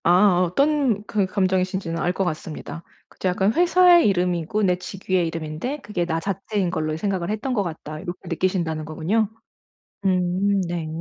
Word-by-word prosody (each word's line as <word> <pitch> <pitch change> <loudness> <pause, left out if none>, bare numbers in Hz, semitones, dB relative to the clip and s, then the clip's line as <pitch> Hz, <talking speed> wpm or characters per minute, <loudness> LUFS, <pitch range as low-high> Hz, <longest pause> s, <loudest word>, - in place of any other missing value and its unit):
아 180 +1 +4
어떤 245 - +2
그 205 -3 0
감정이신지는 185 -2 0
알 175 - +1
것 195 - 0
같습니다. 160 0 -5 0.3
그쵸. 185 - -3
약간 190 +3 +2
'회사의 350 -1 +5
이름이고 180 +1 0
내 180 -2 +3
직위의 185 -1 -2
이름인데 165 - -4
그게 195 -4 -2
나 165 -1 -1
자체인 195 0 -2
걸로 155 -3 -2
생각을 190 -1 -2
했던 220 +5 -2
것 210 -5 +1
같다.' 155 -3 -6
요렇게 175 0 -6
느끼신다는 165 -3 -1
거군요. 190 +8 0 0.8
음 185 +2 +2
네. 170 -2 -3
185 Hz, 350 characters per minute, -23 LUFS, 170-205 Hz, 0.8 s, 회사의